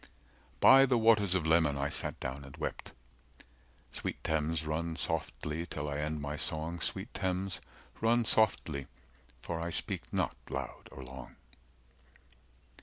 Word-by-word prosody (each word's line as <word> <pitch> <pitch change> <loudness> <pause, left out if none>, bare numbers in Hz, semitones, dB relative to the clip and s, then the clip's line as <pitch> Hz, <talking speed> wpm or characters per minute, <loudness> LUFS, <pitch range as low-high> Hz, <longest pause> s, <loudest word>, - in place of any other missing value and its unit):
By 135 +1 +8
the 125 -2 +3
waters 110 -4 +4
of 85 -4 +1
Leman 80 -3 +4
I 70 +1 0
sat - - -3
down 65 +2 -4
and 70 0 -11
wept… - - -4 1.0
Sweet - - -4
Thames, 80 0 0
run 80 +2 -2
softly 80 0 -2
till 75 -2 -4
I 70 0 -2
end 75 +1 -2
my 70 +1 -3
song, 80 +3 -2
Sweet - - -4
Thames, 95 0 -1 0.4
run 115 +1 +3
softly, 80 -11 +2 0.6
for 85 -1 -3
I 85 +1 -2
speak - - -1
not - - 0
loud - - -5
or 65 - -9
long. 65 +1 -10
80 Hz, 140 wpm, -32 LUFS, 75-95 Hz, 1.0 s, By